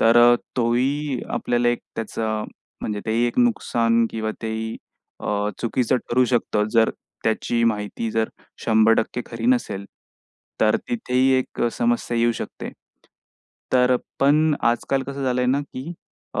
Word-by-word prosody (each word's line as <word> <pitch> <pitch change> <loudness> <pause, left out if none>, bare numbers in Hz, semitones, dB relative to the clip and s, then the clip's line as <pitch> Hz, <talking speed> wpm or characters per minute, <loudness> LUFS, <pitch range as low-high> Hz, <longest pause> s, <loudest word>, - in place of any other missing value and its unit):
तर 115 +1 +5
अ, 120 0 +7 0.2
तो 120 -1 +2
ही 140 +1 0
आपल्याला 120 0 +1
एक 120 - +1 0.2
त्याचं 110 -1 -2 0.4
म्हणजे 105 -1 -2
तेही 115 +2 +2
एक 120 - -3
नुकसान 115 - +2
किंवा 110 -1 -2
तेही 110 0 -3 0.4
अ, 105 0 -1
चुकीचं 125 +1 +1
ठरू 125 +1 +4
शकतं, 110 -3 +1
जर 115 -1 +4 0.3
त्याची 115 +1 0
माहिती 110 0 -1
जर 110 0 0 0.4
100% 115 +2 +3
खरी 115 -1 -5
नसेल, 120 -6 +1 0.8
तर 110 -1 +4
तिथेही 135 - +1
एक 130 - -4
समस्या 120 0 0
येऊ 120 0 +3
शकते. - - -6 1.0
तर 125 0 +4 0.2
पण 150 +2 +4 0.2
आजकाल 135 +3 -1
कसं 140 +1 -5
झालं 125 -1 +1
आहे 125 - +1
ना, 140 +2 +2
की 140 +3 -7 0.4
अ, - - 0
120 Hz, 145 wpm, -23 LUFS, 110-130 Hz, 1.0 s, अ